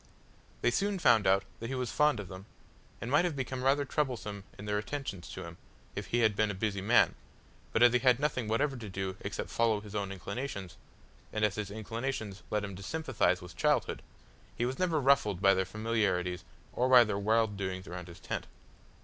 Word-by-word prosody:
They 120 - +4
soon 200 +7 0
found 115 - +4
out 95 +1 +4 0.2
that 115 - -5
he 135 - -2
was 125 -2 -2
fond 150 -5 +3
of 100 - -6
them, 95 +3 -10 0.5
and 115 - -5
might 145 +5 +5
have 175 -4 -1
become 130 -1 -3
rather 140 +2 +3
troublesome 120 -9 -2
in 105 - -8
their 105 0 0
attentions 105 -6 -5
to - - -6
him, 85 0 -9 0.4
if - - -4
he 120 - +1
had 110 -3 +3
been 110 +1 +2
a 100 - -3
busy 100 0 -1
man, 110 +5 +4 0.6
but 115 - +3
as 120 -1 +7
he 125 - +4
had 125 -1 +4
nothing 135 -6 0
whatever 135 +6 +1
to 115 -4 -7
do 95 0 -3
except - - -5
follow 115 -2 +2
his 105 -1 -11
own 100 -2 -2
inclinations, 100 -1 -5 0.6
and 110 0 +2
as 105 - +1
his 105 -1 -4
inclinations 110 -1 -4
led 105 -1 0
him 100 -2 -5
to - - -9
sympathise 105 - 0
with 90 -1 -10
childhood, - - +1 0.6
he 120 - +1
was 130 +2 -3
never 175 -4 +2
ruffled 130 -9 +3
by 95 0 +6
their 95 0 +1
familiarities 95 -4 0 0.3
or 125 +1 +1
by 125 -2 +9
their 105 -3 -2
wild 110 0 +2
doings 95 -1 -4
around 90 0 -7
his 85 - -11
tent. - - -4
110 Hz, 210 wpm, -31 LUFS, 100-125 Hz, 0.6 s, by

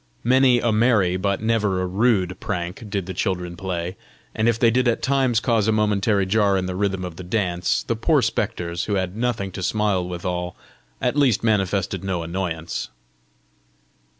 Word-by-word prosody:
Many 130 0 +4
a 120 -1 +1
merry 105 -5 +3
but 100 +2 -1
never 105 -4 +1
a 90 - 0
rude 95 -1 +1
prank 90 +3 -4
did 100 -2 -2
the 95 - -5
children 90 -2 -2
play; 90 0 -4 0.4
and 110 +2 +2
if 115 - +1
they 115 0 +4
did 125 +2 +2
at 120 - 0
times 130 -4 +2
cause 115 -4 +1
a - - +4
momentary 105 -1 +2
jar 100 0 +2
in 95 - -1
the 90 - -3
rhythm 95 -1 -1
of 85 -2 -8
the 90 - -7
dance, 90 -2 0
the 115 - -1
poor 140 +4 +2
spectres, 85 -6 -2
who 105 - -1
had 95 0 -2
nothing 115 -4 -1
to 95 - -6
smile 105 -1 +1
withal, 90 0 -3 0.4
at 125 +2 0
least 140 -8 +3
manifested 100 -4 0
no 90 -3 -2
annoyance. 85 -1 -4
100 Hz, 180 wpm, -22 LUFS, 90-115 Hz, 0.4 s, Many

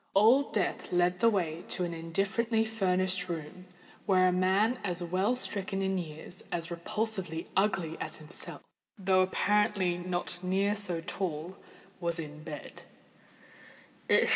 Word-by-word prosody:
Old 235 +8 +5
Death 200 -4 -1
led 180 0 +2
the 230 - +6
way 170 -6 -1
to 180 - -1
an 170 -1 -2
indifferently 200 +7 0
furnished 185 -4 0
room, 170 +2 -6 0.4
where 185 -2 +5
a - - +2
man 195 +7 +2
as 180 -2 -2
well 185 +7 +1
stricken 195 -5 -2
in 190 -1 +1
years 160 +2 -8
and - - -11
as 170 0 -4
repulsively 180 -1 -2
ugly 190 -5 +1
as - - -4
himself, 155 +2 -6 0.3
though 190 -1 +3
apparently 190 -1 +2
not 175 0 -2
near 195 +3 +1
so 190 -5 +2
tall, 175 -1 -3 0.4
was 170 -1 +1
in 150 -2 -6
bed. 150 - -8
185 Hz, 140 wpm, -30 LUFS, 170-200 Hz, 0.4 s, the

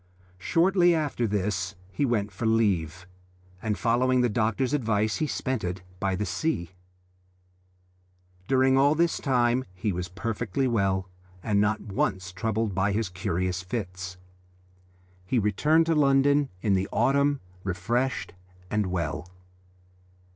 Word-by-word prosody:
Shortly 175 - +3
after 145 -7 -1
this 100 -2 -1 0.2
he 120 +10 0
went 105 -5 0
for 105 +5 -3
leave, 95 -6 +1 0.6
and 110 -2 -1
following 125 +2 +2
the 120 - +2
doctor's 115 +5 0
advice 110 -6 +1
he 155 - 0
spent 130 -4 -2
it 90 +1 -4 0.2
by 95 -2 0
the 105 +3 -2
sea. 90 - -2 1.8
During 130 0 +4
all 145 +2 +4
this 170 +1 +1
time 125 -2 +2
he 100 +3 -1
was 90 0 -3
perfectly 115 +6 -2
well, 95 -5 +1 0.4
and 105 -2 +1
was - - +4
not 105 +1 +1
once 95 -3 -2
troubled 110 +1 -1
by 95 +2 +1
his 110 -1 -1
curious 90 0 -2
fits. 90 -3 -5 1.1
He 90 +8 -1
returned 150 +10 +3
to 165 - +2
London 140 -1 +3
in 105 - +2
the 95 +1 0
autumn 140 +1 +2 0.2
refreshed 115 +8 -1 0.4
and 105 -2 +1
well. 85 -2 -3
110 Hz, 135 wpm, -27 LUFS, 95-130 Hz, 1.8 s, During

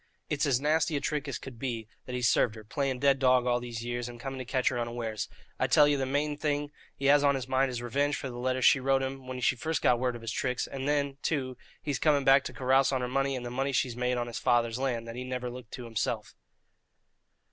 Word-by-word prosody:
It's 150 0 +1
as 130 -3 +3
nasty 155 +2 +1
a - - 0
trick 150 0 -2
as 140 - -3
could 130 -4 -10
be 115 -4 -3 0.2
that 125 - -4
he's 125 -1 +2
served 110 0 +3
her, 110 - -10
playing 135 +4 -2
dead 135 +1 +3
dog 130 -1 +4
all 120 -1 +2
these 120 -1 -6
years, 120 0 -3
and 120 -1 -10
coming 135 +1 -5
to 130 - -5
catch 130 +1 +1
her 125 - -2
unawares. 115 -2 -3 0.3
I - - +2
tell 150 - +6
ye 145 - +3
the 135 -1 -1
main 145 +2 0
thing 145 -1 -1 0.2
he 140 - -5
has 145 +1 +6
on 140 -1 +4
his 130 -2 -4
mind 130 +1 +2
is 120 -1 -4
revenge 140 +4 +1
for - - -4
the 120 -1 -7
letters 130 0 0
she 140 - +6
wrote 135 0 +2
him 135 -1 -5
when 130 0 -5
she 130 - +3
first 160 +5 -2
got 120 -1 +4
word 125 -1 0
of 115 - -9
his 115 - -3
tricks, 125 +1 -1
and 135 0 -5
then, 140 -2 0
too, 130 -5 -1 0.3
he's 145 -5 -2
coming 145 -3 +3
back 135 +1 +6
to - - -5
carouse 135 +1 +3
on 130 -2 0
her 125 - -1
money 135 +2 0
and 125 -1 -5
the 120 - -5
money 135 +2 -1
she's 125 -2 0
made 125 0 0
on 120 - -1
his 120 0 -5
father's 120 0 +2
land, 120 -4 -1
that 115 - -7
he 125 - -4
niver 125 -1 -4
looked 125 -2 -10
to 125 - -6
himself." 110 -1 -2
130 Hz, 265 wpm, -29 LUFS, 120-140 Hz, 0.3 s, tell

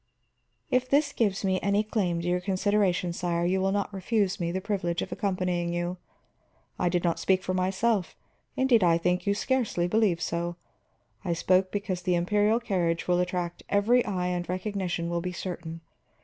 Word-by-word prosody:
"If 255 0 +2
this 285 +1 +2
gives 200 -3 0
me 185 -1 +1
any 200 +1 +2
claim 190 -6 -1
to 175 - -4
your 180 0 +1
consideration, 190 -2 +1
sire, 170 -1 -1
you 190 +2 +1
will 195 0 +1
not 200 +1 -1
refuse 195 0 0
me 170 -1 -1
the 185 - -1
privilege 185 -4 -1
of - - -8
accompanying 180 -3 -1
you. 175 +1 -2 0.8
I 175 - +2
did 175 0 0
not 170 -2 +1
speak 190 -1 +2
for 185 - -2
myself, 190 +2 0 0.4
indeed 250 -5 +4
I 170 -1 +5
think 180 +3 0
you 200 - +3
scarcely 220 -7 0
believe 205 -3 +2
so; 170 +1 -2 0.7
I 175 -3 0
spoke 185 +2 +2
because 200 -3 -2
the 180 0 +1
imperial 210 +6 +2
carriage 175 -7 -1
will 180 0 +3
attract 180 -1 -2
every 230 +5 +3
eye 180 -3 -2
and 175 -1 -3
recognition 185 -2 -2
will 170 0 -1
be 180 +1 -4
certain. 170 -2 -6
185 Hz, 175 wpm, -27 LUFS, 175-205 Hz, 0.8 s, I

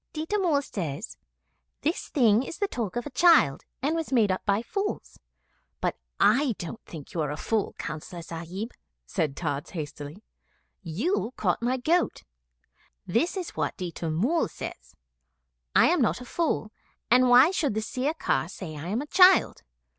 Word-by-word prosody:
'Ditta 320 +7 -1
Mull 315 -7 +2
says, 175 - -5 0.7
"This 320 +4 -1
thing 230 -5 +4
is 270 - -6
the 405 - 0
talk 225 - -4
of 240 - -2
a 290 - -6
child, 320 - +4 0.2
and 300 +4 +1
was 325 -3 -3
made 225 -6 +4
up 185 - -2
by 200 +3 +2
fools." 400 - -4 0.6
But - - -1 0.2
I 240 +5 +4
don't 175 +7 -7
think 155 -5 -10
you 165 - -1
are 150 - -1
a 150 - -4
fool, 220 +4 -1
Councillor 165 +3 -6
Sahib,' 170 +8 -6 0.3
said 140 - -2
Tods 145 -4 -3
hastily. 150 +3 -7 0.6
'You 225 - -1
caught 185 0 0
my 250 +2 +1
goat. 330 +8 +1 0.8
This 325 - 0
is 360 -2 -4
what - - -2
Ditta 175 -3 -4
Mull 235 - +1
says - - -9 0.8
'I - - +7
am - - +2
not 165 - +2
a 250 - -9
fool, 275 -7 -1 0.4
and 250 +1 +6
why 255 +7 +7
should 295 - 0
the 220 - 0
Sirkar 255 - -1
say 175 -5 -7
I 150 +3 -6
am 220 +9 -1
a - - -8
child? 370 +4 +5
225 Hz, 165 wpm, -27 LUFS, -, 0.8 s, I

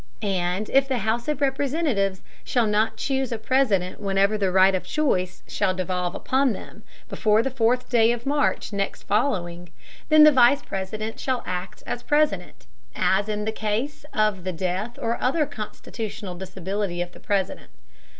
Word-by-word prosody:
And 190 0 -1
if 270 0 +4
the 265 -2 0
House 225 +3 -1
of 300 -1 -1
Representatives 270 - 0 0.2
shall 240 -3 +1
not 210 +1 +1
choose 265 -2 -1
a 230 - -1
President 220 -6 +1
whenever 200 +1 +2
the 195 -3 0
right 190 +1 +5
of 185 - 0
choice 185 -13 -1
shall 185 - 0
devolve 180 -1 -2
upon 265 -2 +1
them, - - -10 0.3
before 215 0 +2
the 270 - -2
fourth 245 0 +1
day 230 -2 +4
of 240 0 -4
March 285 -5 0
next 200 0 -2
following, 180 -6 -1 0.4
then 310 0 +8
the 305 - +9
Vice 260 0 +5
President 215 +3 -5
shall 260 -2 -1
act 180 0 -5
as 240 - -4
President, 295 -12 0 0.3
as 200 +3 +1
in 210 0 -2
the 220 - 0
case 220 +8 -3
of 215 -4 +1
the 185 - -2
death 185 +7 -3
or 230 +1 -2
other 295 +5 +2
constitutional 215 -5 -6
disability 190 0 -4
of 175 - -11
the - - -15
President. 195 -2 -2
215 Hz, 165 wpm, -24 LUFS, 190-255 Hz, 0.4 s, the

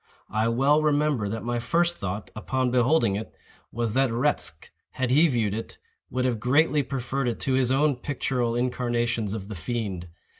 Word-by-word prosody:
I 110 +1 +1
well 135 +6 +3
remember 145 -7 +1
that 115 +2 -4
my 120 0 -1
first 170 +7 +1
thought, 100 +1 -4
upon 130 +3 -1
beholding 125 -3 +3
it, 110 +2 -6 0.4
was 115 -2 -2
that 135 +1 +3
Retzch, 125 +6 -1 0.2
had 130 -1 -1
he 155 +6 +6
viewed 115 -8 0
it, 115 +2 -6 0.3
would 130 0 -1
have 120 -4 0
greatly 145 +6 +3
preferred 135 0 -2
it 120 - -2
to 135 - 0
his 130 -1 +2
own 140 0 +2
pictural 125 -3 -1
incarnations 120 -3 -1
of 100 -3 -6
the 110 - -6
fiend. 100 -3 -4
125 Hz, 175 wpm, -26 LUFS, 115-135 Hz, 0.4 s, he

